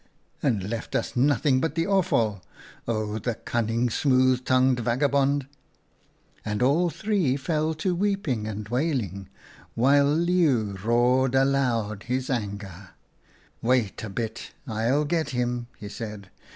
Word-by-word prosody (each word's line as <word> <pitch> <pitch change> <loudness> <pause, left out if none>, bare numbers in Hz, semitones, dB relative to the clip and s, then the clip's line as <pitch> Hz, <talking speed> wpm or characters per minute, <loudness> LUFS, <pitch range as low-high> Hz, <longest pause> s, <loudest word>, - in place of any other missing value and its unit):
' - - -40
And 105 -8 0
left 115 +1 -5
us - - -1
nothing 135 0 +3
but 160 0 -1
the 165 0 +1
offal. 115 - +1 0.5
Oh, 110 -1 -2
the 115 +2 -2
cunning, 115 +1 -1
smooth 130 -1 +3
tongued 130 -1 +3
vagabond! 140 +3 +1 0.3
' - - -40
" - - -36
And 105 +1 -1
all 160 +7 +3
three 185 -9 0
fell 155 +2 -1
to 180 +4 -1
weeping 175 - -1
and 105 -1 -5
wailing, 120 - -2 0.5
while 140 +4 +4
Leeuw 155 - +2
roared 125 +3 +3
aloud 125 -6 +1
in 125 - 0
his 130 +1 -3
anger. 100 -5 -5 0.2
" - - -34
' - - -32 0.2
Wait 120 -5 +1
a 110 - -5
bit, 110 +2 -5
I'll 120 +5 0
get 160 -1 0
him,' 120 -1 -1
he 105 - -8
said. 105 -3 -7
125 Hz, 150 wpm, -25 LUFS, 110-145 Hz, 0.5 s, while